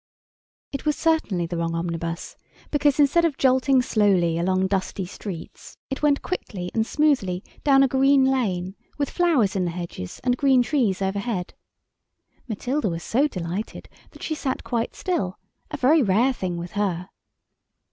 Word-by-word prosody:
It 275 - -5
was 300 - +2
certainly 315 - +1
the 170 +1 -4
wrong 165 0 -1
omnibus 165 0 -4 0.4
because 290 -1 +2
instead 295 +4 +4
of 315 -5 +1
jolting 260 0 +3
slowly 190 -8 +2
along 185 +2 +1
dusty 190 0 -2
streets, 180 -2 -9
it 270 - -3
went 290 -1 +2
quickly 185 - -4
and 225 -1 0
smoothly 235 -12 +1 0.2
down 275 -2 +5
a - - +4
green 270 +1 +4
lane, 195 -9 0 0.2
with 285 -1 -1
flowers 300 - +2
in 190 - +1
the - - -1
hedges, 170 - -6
and 250 0 +1
green 265 -2 +4
trees 225 -8 0
overhead. 195 -1 -2 0.9
Matilda 245 +2 -1
was 165 -1 -4
so 275 +6 +2
delighted 185 - -5 0.2
that - - -14
she 315 - -2
sat 280 -4 -3
quite 235 -1 -2
still, 195 - -2 0.3
a 300 - -4
very 290 +4 +4
rare 230 +4 +3
thing 180 -7 -3
with 170 +1 -6
her. 190 -3 -2
220 Hz, 155 wpm, -24 LUFS, 180-275 Hz, 0.9 s, down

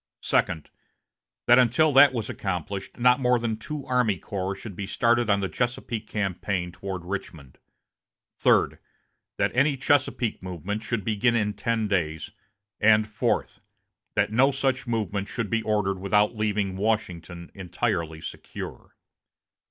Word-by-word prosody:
Second. 80 -4 0 0.7
That 120 +1 +7
until 130 +5 +4
that 140 +1 +8
was 115 -4 -3
accomplished 95 0 -4
not 125 +1 +4
more 125 -1 +3
than 115 -2 -1
two 150 +5 -6
army 125 -6 +1
corps 95 +1 -4
should 100 -1 -8
be 100 +1 -5
started 120 +2 +2
on 100 -1 +3
the 95 - 0
Chesapeake 120 -1 -3
campaign 95 -3 -2
toward 90 0 -6
Richmond 85 -8 -6 0.8
Third. - - +3 0.6
That - - +1
any 140 +2 +3
Chesapeake 130 -4 +1
movement 95 +3 -4
should 105 -2 -3
begin 115 +2 +2
in 105 -2 +1
ten 115 -2 -1
days; 80 -6 -1 0.5
and 110 0 +5
Fourth. 105 0 -1 0.5
That - - +2
no 130 +5 +4
such 135 -2 -1
movement 105 -4 -2
should 115 -4 -4
be 115 0 +1
ordered 105 -3 0
without 105 +3 +2
leaving 105 -3 -1
Washington 90 -5 -2
entirely 85 -4 -2
secure. - - -8
105 Hz, 135 wpm, -26 LUFS, 95-120 Hz, 0.8 s, that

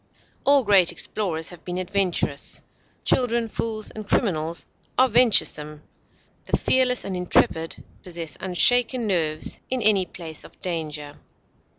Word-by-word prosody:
All 280 -1 +5
great 195 -5 +5
explorers 170 -3 -2
have 175 -2 -13
been 180 0 -5
adventurous; 185 -6 -1 0.4
children, 235 -2 +1
fools, 220 -1 -4
and 215 -1 -9
criminals 165 -5 0 0.3
are 260 - +5
venturesome. 150 -11 +2 0.6
The - - 0
fearless 255 -1 +2
and 195 - -4
intrepid 165 -2 0 0.2
possess 165 -5 -5
unshaken 245 +6 +3
nerves 160 -6 0
in 255 -2 -1
any 200 -4 +4
place 160 -3 -7
of - - -16
danger. 150 -4 -5
185 Hz, 120 wpm, -24 LUFS, 160-225 Hz, 0.6 s, All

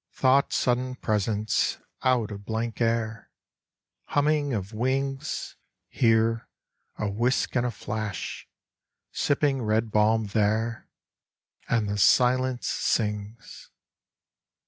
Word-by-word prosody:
Thought 135 +1 +3
sudden 125 +1 0
presence 105 -2 0 0.2
Out 125 -5 +2
of 100 0 -7
blank 110 +2 -3
air 115 -1 -1 0.8
Humming 145 0 +1
of 100 -2 -3
wings! 135 +5 -2 0.3
Here 115 -1 +2 0.5
a 105 - -1
whisk 120 +8 0
and 125 -1 +2
a - - -1
flash! 110 -2 -5 0.6
Sipping 145 -2 +1
red 110 0 0
balm 110 +1 +3
there 110 +2 0 0.8
And 110 -2 +1
the 100 0 -2
silence 125 +3 +3
sings. 105 0 -2
115 Hz, 100 wpm, -26 LUFS, 110-130 Hz, 0.8 s, Thought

